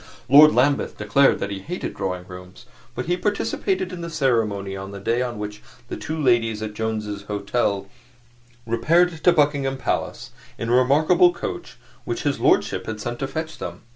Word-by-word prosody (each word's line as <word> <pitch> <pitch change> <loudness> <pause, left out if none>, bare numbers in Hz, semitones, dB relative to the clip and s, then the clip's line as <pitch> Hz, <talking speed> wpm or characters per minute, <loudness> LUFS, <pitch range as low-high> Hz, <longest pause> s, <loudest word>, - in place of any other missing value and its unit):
Lord 150 +4 +8
Lambeth 140 +3 +1
declared 110 +7 +3
that 100 - -4
he 100 - -4
hated 175 - -5
Drawing 90 -1 -4
Rooms, 90 0 -12 0.3
but - - -3
he 175 - +1
participated 205 - -1
in 175 - -6
the 170 - -5
ceremony 110 -10 0
on 95 0 -7
the 100 0 -8
day 115 +5 0
on 120 -2 -3
which 105 0 -6 0.3
the - - -4
two 160 0 -5
ladies 115 -5 +2
at 105 -1 -5
Jones's 105 -2 -3
Hotel 100 -1 -1 0.8
repaired 160 +9 +2
to 175 - +6
Buckingham 145 -4 +1
Palace 130 - -3 0.3
in 115 - -4
a 120 - +4
remarkable 155 +8 +4
coach 175 - -6 0.3
which - - -4
his - - 0
lordship - - +2
had 110 -1 -4
sent 120 +2 -5
to 135 - -2
fetch 160 +3 -5
them. - - -6
120 Hz, 175 wpm, -23 LUFS, 105-155 Hz, 0.8 s, Lord